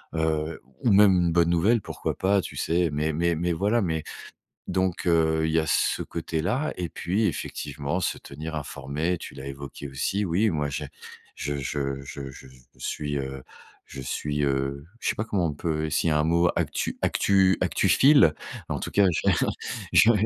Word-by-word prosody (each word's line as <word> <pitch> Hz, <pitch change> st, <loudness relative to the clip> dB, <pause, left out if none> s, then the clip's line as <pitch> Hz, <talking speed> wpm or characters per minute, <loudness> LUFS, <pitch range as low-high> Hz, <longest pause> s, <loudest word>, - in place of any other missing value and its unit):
heu, 80 Hz, 0 st, -1 dB, 0.2 s
ou 120 Hz, -, +3 dB
même 100 Hz, 0 st, +7 dB
une 85 Hz, -1 st, +2 dB
bonne 85 Hz, 0 st, +3 dB
nouvelle, 100 Hz, +8 st, +3 dB
pourquoi -, -, -4 dB
pas, 100 Hz, +1 st, +3 dB
tu -, -, -8 dB
sais. 85 Hz, 0 st, +1 dB
Mais 75 Hz, +2 st, -1 dB
mais 85 Hz, +2 st, +1 dB
mais 85 Hz, +2 st, 0 dB
voilà, 105 Hz, +7 st, +1 dB
mais 80 Hz, -3 st, -1 dB, 0.6 s
donc, 95 Hz, -1 st, -1 dB
heu, 80 Hz, -2 st, +3 dB
il -, -, 0 dB
y 80 Hz, -, +3 dB
a 80 Hz, -, 0 dB
ce -, -, +1 dB
côté-là. 90 Hz, -, -2 dB
Et 90 Hz, -, -2 dB
puis, 95 Hz, +6 st, -1 dB
effectivement, 75 Hz, -2 st, -3 dB
se -, -, -1 dB
tenir 80 Hz, +3 st, -7 dB
informé, 75 Hz, +4 st, -2 dB
tu -, -, -9 dB
l'as 70 Hz, 0 st, -8 dB
évoqué 70 Hz, +1 st, -7 dB
aussi. 80 Hz, +10 st, -1 dB
Oui, 100 Hz, +4 st, +2 dB
moi, 75 Hz, -4 st, -1 dB
j'ai 75 Hz, +1 st, -4 dB, 0.5 s
je 75 Hz, 0 st, -3 dB
je 70 Hz, 0 st, -2 dB
je 70 Hz, -, -8 dB
je 65 Hz, -, -13 dB, 0.3 s
suis, 75 Hz, -1 st, -3 dB
heu 65 Hz, -1 st, -5 dB, 0.4 s
je 70 Hz, -, -9 dB
suis, 75 Hz, +3 st, -2 dB
heu, 70 Hz, +1 st, -1 dB, 0.2 s
je -, -, 0 dB
sais -, -, 0 dB
pas 110 Hz, -, -2 dB
comment 95 Hz, -6 st, 0 dB
on 75 Hz, -, -3 dB
peut 80 Hz, +1 st, -2 dB
essayer 80 Hz, +1 st, +1 dB
un 75 Hz, 0 st, +2 dB
mot 85 Hz, +2 st, +3 dB
actu -, -, -1 dB
actu 95 Hz, -1 st, +3 dB
actuphile? 140 Hz, -, +5 dB, 0.4 s
En -, -, -2 dB
tout -, -, -5 dB
cas, 100 Hz, -, +4 dB
j'ai 80 Hz, -, +2 dB, 0.6 s
j'ai 115 Hz, -, +7 dB
80 Hz, 180 wpm, -26 LUFS, 75-90 Hz, 0.6 s, même